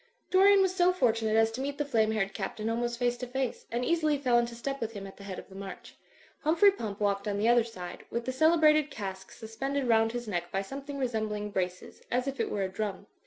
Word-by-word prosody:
Dorian 390 +1 +6
was 375 -1 +1
so 360 -1 +4
fortunate 225 -9 +1
as 225 0 +4
to 245 +4 -5
meet 285 +1 -3
the 295 - -1
flame 225 -6 +2
haired 195 -3 -1
Captain 215 +2 -3
almost 240 +1 -1
face 245 0 0
to 250 - -5
face, 260 0 -3
and 240 +2 -1
easily 310 -3 +2
fell 250 -4 +3
into 235 0 -2
step 275 +3 -4
with 225 0 -3
him 200 -2 -7
at 195 - -11
the 200 - -11
head 195 -2 -6
of - - -9
the 190 - -15
march. 195 0 -9 0.4
Hum 310 +2 +1
phrey 400 +3 +6
Pump 210 - -5
walked 200 0 0
on 200 -1 -1
the 210 +2 +1
other 240 0 +5
side, 180 -6 -8
with 235 0 -3
the 260 - -1
cele 315 +6 +4
brated 305 -1 +4
cask 190 -7 -6
suspended 265 +5 -3
roimd 225 -1 +3
his 240 -1 -4
neck 175 -4 -3
by 195 0 -1
something 275 +6 -7
resembling 215 -5 -2
braces, 185 -1 -4
as 250 +2 0
if 275 0 -4
it - - 0
were 200 - -1
a - - 0
drum. 200 0 -4
235 Hz, 250 wpm, -29 LUFS, 205-275 Hz, 0.4 s, Dorian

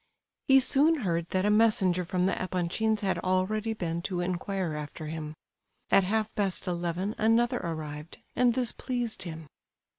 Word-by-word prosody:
He 270 0 +7
soon 290 +4 +3
heard 170 -1 -1
that 185 +1 0
a 210 - +3
messenger 210 -5 +4
from 180 +1 0
the 190 - +2
Epanchins' 185 +4 0
had 195 -2 0
already 200 +4 0
been 170 -5 -3
to 180 0 -3
inquire 180 -1 -2
after 150 +1 -6
him. 155 0 -5 0.6
At 195 - +5
half 220 +2 0
past 195 -2 -2
eleven 175 +3 -2
another 235 +3 +3
arrived; 155 -2 -6 0.2
and 245 -2 +3
this 245 -3 +1
pleased 245 -3 -3
him. 160 -2 -6
185 Hz, 155 wpm, -28 LUFS, 170-220 Hz, 0.6 s, He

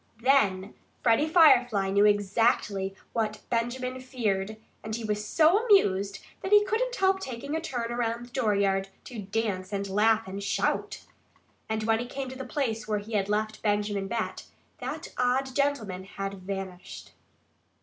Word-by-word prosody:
Then 205 -8 +3 0.3
Freddie 240 +6 +4
Firefly 245 - +5
knew 200 +1 +4
exactly 205 -1 +1 0.2
what 215 -2 -1
Benjamin 250 +2 -1
feared. 215 -5 -2 0.3
And 220 0 -3
he 235 - -5
was 210 -1 -1
so 330 - +4
amused 200 - +3 0.2
that 380 - -4
he 415 0 +7
couldn't - - 0
help 380 0 +2
taking 280 -1 -5
a 320 - -1
turn 240 -7 -3
around 235 0 -2
the 240 - -18
dooryard, 200 -6 +1
to 240 -3 -8
dance 195 -2 -2
and 200 -1 -2
laugh 215 +2 +2
and 195 +1 -5
shout. 200 - -1 0.6
And 220 0 -1
when 225 0 +2
he 245 - -4
came 270 +1 -5
back 260 - -8
to 265 - -5
the 255 - -11
place 225 -8 -2
where 210 -1 0
he 210 +2 -7
had 200 -1 0
left 215 +1 -1
Benjamin 205 -1 0
Bat, 230 +1 -3 0.3
that - - -5
odd 255 +1 +1
gentleman 225 -10 -1
had 195 0 -5
vanished. 190 -1 -7
220 Hz, 160 wpm, -28 LUFS, 200-255 Hz, 0.6 s, he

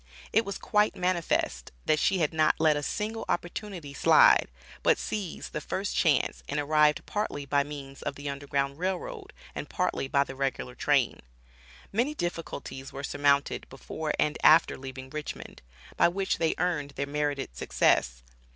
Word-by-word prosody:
It 225 +2 +4
was 200 -1 -4
quite 210 0 +2
manifest, 170 - -1
that 155 - +3
she 190 - +2
had 160 -3 +1
not 155 -1 +3
let 155 -1 +4
a 145 - -1
single 220 +8 -3
opportunity 175 -4 -4
slide, - - +6 0.3
but - - +4
seized 200 -6 -5
the 150 - -3
first 195 +6 -3
chance 155 -6 +2
and 145 - -1
arrived 150 0 +3
partly 205 -9 -3
by 140 +1 +2
means 140 -2 -9
of - - -3
the 145 +1 -7
Underground 140 0 -2
Rail 185 +1 0
Road - - -8 0.2
and - - -6
partly - - -1
by 140 +1 +3
the 135 - -8
regular 135 -2 -2
train. 135 -2 +1 0.7
Many 245 +9 0
difficulties 150 - -5
were 140 - -7
surmounted 145 0 +1
before 150 +3 -4
and 150 - +1
after 160 +1 +6
leaving 130 0 -8
Richmond, 150 -1 -7 0.4
by - - +6
which 190 +3 -1
they 165 -1 +1
earned 155 -5 -1
their 140 - -1
merited 145 - -2
success. - - +1
150 Hz, 160 wpm, -28 LUFS, 140-175 Hz, 0.7 s, slide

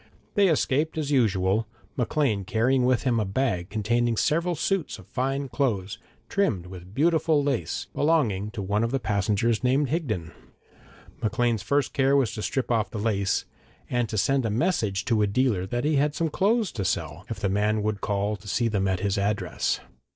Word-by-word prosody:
They 200 -1 +4
escaped 155 -1 +1
as 150 -2 -2
usual, 105 -4 +2 0.3
Maclean 125 -5 0
carrying 120 +6 +2
with 125 -2 +2
him 120 -3 +2
a - - +1
bag 95 -4 -1
containing 115 +2 0
several 170 +7 +1
suits 185 +2 -1
of - - -14
fine 135 +2 -2
clothes, 115 -5 -1 0.3
trimmed 115 - 0
with 90 +2 -11
beautiful 160 -1 +3
lace, 130 - -1
belonging 120 -11 +1
to 105 -4 -4
one 105 +3 0
of 115 - +1
the 135 +2 0
passengers 110 +2 0
named 135 +2 +2
Higden. 110 - -2 0.9
Maclean's 115 0 +1
first 140 -2 0
care 135 0 +3
was 135 -5 +2
to 105 - -5
strip 130 +3 -2
off 115 -2 +1
the - - -6
lace, 100 -2 0 0.5
and 120 -3 0
to 110 - -3
send 135 +6 +2
a 115 - 0
message 110 - 0
to 115 -3 +2
a 105 - +3
dealer 100 -4 +1
that 120 +5 -2
he 150 -1 +2
had 145 +1 +1
some 165 -1 0
clothes 210 +5 +1
to 105 - -3
sell, 85 -3 -2
if 115 -3 -4
the 100 - 0
man 105 +2 +1
would 105 -2 -2
call 105 +1 0
to 100 +1 -15
see 115 +4 +1
them 100 -3 0
at 95 -1 0
his 100 0 0
address. 100 +1 -1
115 Hz, 190 wpm, -26 LUFS, 100-140 Hz, 0.9 s, They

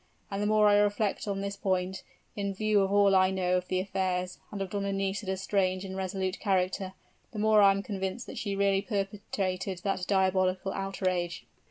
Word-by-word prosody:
And 195 +1 -2
the 205 - +1
more 215 0 +4
I 205 0 +6
reflect 205 0 +1
on 195 -1 -2
this 200 0 -3
point, 190 -1 -1 0.3
in 200 -1 -2
view 215 0 +2
of 195 0 0
all 200 -1 +5
I 185 0 +5
know 185 -1 0
of 180 0 -4
the 185 - 0
affairs, 185 -1 -2
and 205 - -5
of 195 -2 -4
Donna 200 -1 -1
Nisida's 195 0 -2
strange 190 -1 0
and 190 0 -6
resolute 190 0 -2
character, 190 -1 0 0.4
the - - -7
more 215 0 +5
I 200 - +8
am 195 0 +1
convinced 195 +3 -4
that - - -7
she 200 -3 -2
really 195 0 +2
perpetrated 195 -3 -3
that 195 -2 -1
diabolical 190 -1 +1
outrage." 185 -3 -2
195 Hz, 190 wpm, -29 LUFS, 185-200 Hz, 0.4 s, I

